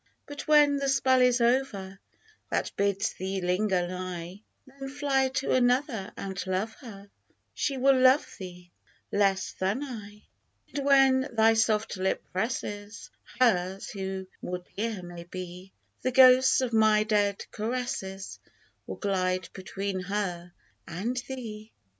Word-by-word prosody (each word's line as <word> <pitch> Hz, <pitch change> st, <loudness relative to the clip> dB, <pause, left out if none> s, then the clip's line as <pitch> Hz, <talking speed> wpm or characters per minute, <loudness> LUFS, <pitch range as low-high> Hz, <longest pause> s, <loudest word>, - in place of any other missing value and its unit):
But 290 Hz, 0 st, -8 dB
when 295 Hz, -2 st, +5 dB
the 275 Hz, 0 st, -1 dB
spell 260 Hz, -1 st, +3 dB
is 250 Hz, 0 st, +4 dB
over 235 Hz, -6 st, 0 dB, 0.5 s
That -, -, -1 dB
bids 200 Hz, +1 st, 0 dB
thee 190 Hz, +1 st, -3 dB
linger 180 Hz, 0 st, +1 dB
nigh, 180 Hz, +1 st, -6 dB, 0.2 s
Then 270 Hz, 0 st, -9 dB
fly 270 Hz, -1 st, +1 dB
to 265 Hz, -, 0 dB
another 245 Hz, -4 st, +1 dB
and 195 Hz, -1 st, -4 dB
love 190 Hz, +4 st, -1 dB
her 200 Hz, -5 st, -11 dB, 0.2 s
— -, -, -45 dB
She 275 Hz, -2 st, -1 dB
will 265 Hz, 0 st, +4 dB
love 260 Hz, +3 st, +5 dB
thee 180 Hz, -2 st, -10 dB, 0.4 s
less 195 Hz, -1 st, +1 dB
than 195 Hz, +9 st, -2 dB
I. 210 Hz, -6 st, -9 dB, 0.5 s
And 285 Hz, -, -2 dB
when 270 Hz, -1 st, +4 dB
thy 225 Hz, 0 st, +5 dB
soft 220 Hz, -2 st, +1 dB
lip 190 Hz, +1 st, -1 dB
presses 205 Hz, 0 st, -4 dB, 0.3 s
Hers, 190 Hz, -6 st, +1 dB
who 190 Hz, -1 st, -4 dB, 0.2 s
more 180 Hz, 0 st, -5 dB
dear 215 Hz, -2 st, -3 dB
may 175 Hz, -1 st, -9 dB
be, 180 Hz, +1 st, -8 dB, 0.3 s
The 255 Hz, -, 0 dB
ghosts 260 Hz, +1 st, +6 dB
of 250 Hz, -2 st, -2 dB
my 215 Hz, -1 st, +4 dB
dead 205 Hz, -2 st, 0 dB
caresses 215 Hz, -4 st, -4 dB, 0.5 s
Will -, -, -5 dB
glide 185 Hz, -3 st, -1 dB
between 195 Hz, 0 st, -4 dB
her 180 Hz, -2 st, -3 dB, 0.4 s
and 205 Hz, +9 st, -3 dB
thee 225 Hz, -5 st, -7 dB
210 Hz, 135 wpm, -28 LUFS, 190-255 Hz, 0.5 s, ghosts